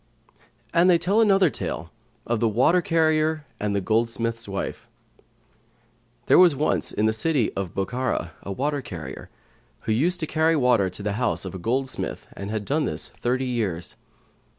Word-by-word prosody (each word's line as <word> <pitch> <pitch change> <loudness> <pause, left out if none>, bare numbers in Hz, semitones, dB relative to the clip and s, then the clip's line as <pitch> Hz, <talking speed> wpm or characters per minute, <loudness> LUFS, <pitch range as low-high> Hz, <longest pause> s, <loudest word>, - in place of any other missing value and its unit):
And 170 +2 +5
they 175 - +6
tell 200 +6 +2
another 195 -6 +4
tale 85 0 -5 0.3
of 120 -1 0
the 115 - +2
WATER 130 - +3
CARRIER[FN#126] 160 -2 +1 0.2
AND 105 -1 -1
THE 100 - +1
GOLDSMITH'S 115 +2 -1
WIFE 100 -1 -5 1.4
There - - +6
was 175 -5 +7
once, 150 +3 0
in 105 - 0
the 110 - +2
city 130 +1 +1
of 95 -3 -4
Bokhara, 120 -3 -2
a 100 - -6
water 140 +6 -1
carrier, 85 -9 -8 0.5
who 110 - -2
used 170 +11 +2
to - - 0
carry 160 +1 +2
water 125 -9 +3
to 90 +3 -8
the 105 - -1
house 125 - 0
of 95 - -6
a 95 - -6
goldsmith 130 +8 -2
and 100 0 -6
had 105 -1 -3
done 150 +5 0
this - - -2
thirty 130 +2 -1
years. 105 -10 -2
125 Hz, 170 wpm, -24 LUFS, 105-155 Hz, 1.4 s, was